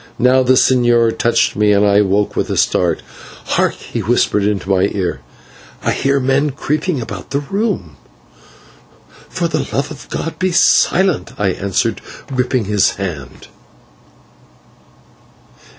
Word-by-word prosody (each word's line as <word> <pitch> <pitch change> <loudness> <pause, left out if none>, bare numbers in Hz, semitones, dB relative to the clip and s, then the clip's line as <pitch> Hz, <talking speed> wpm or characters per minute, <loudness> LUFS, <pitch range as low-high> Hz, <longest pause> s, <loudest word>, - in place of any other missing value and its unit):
Now 130 +1 +4
the 130 0 +3
señor 120 -3 +3
touched 115 -1 +1
me 105 0 +2
and 100 +1 +3
I 100 0 +4
woke 100 +1 0
with - - -1
a - - -2
start. 85 -3 +1 0.5
"Hark," - - +1
he - - -7
whispered 105 - +1
into 100 -2 -1
my 95 +1 +2
ear, 90 -8 -2 0.6
"I - - +1
hear 140 0 +1
men 135 +3 +1
creeping 150 +3 -2
about 100 -5 -7
the 140 - -1
room." 180 - -3 1.3
"For - - -2
the - - -2
love - - -2
of - - -11
God, 165 - -5
be 185 +1 0
silent," 175 -4 +2
I 100 -2 +1
answered, 100 +5 -1 0.3
gripping 125 -2 0
his 105 -1 +1
hand. 80 -10 -7
115 Hz, 135 wpm, -16 LUFS, 100-135 Hz, 1.3 s, Now